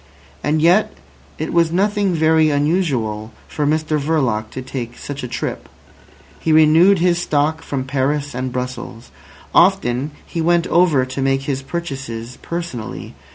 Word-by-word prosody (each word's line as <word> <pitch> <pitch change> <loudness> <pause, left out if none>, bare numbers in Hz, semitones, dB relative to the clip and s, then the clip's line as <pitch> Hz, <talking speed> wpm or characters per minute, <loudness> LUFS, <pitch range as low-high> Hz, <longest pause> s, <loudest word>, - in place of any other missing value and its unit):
And 155 +1 +1
yet 180 +6 +4 0.4
it - - -4
was 170 -1 +3
nothing 200 0 +1
very 160 0 +4
unusual 140 - 0 0.2
for 150 -1 -2
Mr 155 0 +1
Verloc 130 -8 0
to 130 +3 -7
take 125 -2 -6
such 145 0 -6
a 125 - -4
trip. 120 - -5 0.7
He 160 - 0
renewed 160 +5 +6
his 175 0 +2
stock 155 0 0
from 140 -4 -3
Paris 140 +2 -1
and 130 +1 -3
Brussels. 125 - -6 0.4
Often 125 +4 +3 0.2
he 165 - -4
went 170 +1 +2
over 165 -8 +3
to 130 +1 -5
make 135 0 +1
his 135 -1 -2
purchases 135 -7 -6
personally. 120 - -6
145 Hz, 145 wpm, -19 LUFS, 125-165 Hz, 0.7 s, renewed